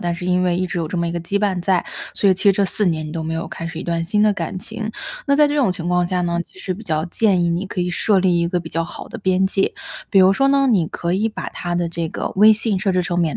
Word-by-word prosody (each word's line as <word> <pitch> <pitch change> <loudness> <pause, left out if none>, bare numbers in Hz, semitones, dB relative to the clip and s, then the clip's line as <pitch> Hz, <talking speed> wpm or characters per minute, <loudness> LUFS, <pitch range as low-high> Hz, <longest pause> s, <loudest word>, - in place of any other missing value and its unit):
但 175 -1 -1
是 175 - -7
因 180 0 +2
为 175 -1 +1
一 185 - 0
直 180 -1 -3
有 165 - -1
这 175 - -4
么 170 0 0
一 - - -2
个 170 0 -3
羁 195 +4 -3
绊 200 -3 0
在， 180 0 +1 0.3
所 200 - +3
以 - - +4
其 190 - -5
实 200 - +7
这 200 +1 +1
4 205 +1 0
年 160 -2 0
你 - - -7
都 160 -1 -4
没 160 0 -3
有 165 - -4
开 165 - -6
始 165 0 -7
一 - - -5
段 170 -1 -1
新 210 +5 +1
的 210 -1 +4
感 195 - -4
情。 215 +3 -6 0.4
那 280 - +3
在 295 0 +5
这 295 - -1
种 245 -10 +2
情 175 -2 -5
况 180 0 +2
下 180 0 -1
呢， 170 -1 -1
其 185 - -17
实 185 - -3
比 215 +5 -9
较 155 -2 -1
建 185 -1 +2
议 170 - +1
你 175 +3 -1
可 185 - -4
以 180 0 -1
设 195 +2 +2
立 180 -2 +2
一 170 - +1
个 175 0 -1
比 165 - -9
较 165 0 -1
好 - - -9
的 235 - -8
边 190 -1 +1
界， 195 0 0 0.3
比 195 - +5
如 190 +1 +6
说 275 +7 +2
呢， 275 -1 +3
你 185 -9 +3
可 170 +2 -3
以 210 +4 +1
把 215 - -6
他 175 0 -4
的 175 -1 0
这 165 -1 -3
个 - - -4
微 215 +2 +8
信 215 -2 0
设 190 0 0
置 180 0 +1
成 175 -1 -2
免 165 -4 0
180 Hz, 345 characters per minute, -20 LUFS, 170-200 Hz, 0.4 s, 微